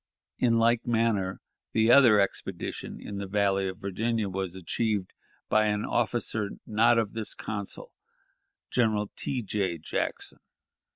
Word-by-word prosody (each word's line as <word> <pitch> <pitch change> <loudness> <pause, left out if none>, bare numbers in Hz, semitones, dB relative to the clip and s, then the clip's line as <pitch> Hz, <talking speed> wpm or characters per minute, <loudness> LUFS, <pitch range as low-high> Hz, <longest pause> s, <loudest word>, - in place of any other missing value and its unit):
In 115 -2 +3
like 115 +1 +2
manner 110 -5 +1 0.3
the 110 +1 +4
other 120 -6 +7
expedition 100 - -3
in 100 -1 -6
the 100 - -4
Valley 100 -1 +1
of 95 -1 -5
Virginia 110 +2 -1
was 95 -1 -3
achieved 100 +2 -2 0.3
by 110 0 +3
an 105 0 0
officer 115 -3 0 0.2
not 115 +2 +4
of 110 -3 0
this 110 -1 -4
council, 100 -3 -5 0.8
General 110 -4 +1
T. 125 -3 -2
J. 95 -4 -1
Jackson. 80 - -3
105 Hz, 130 wpm, -28 LUFS, 100-115 Hz, 0.8 s, other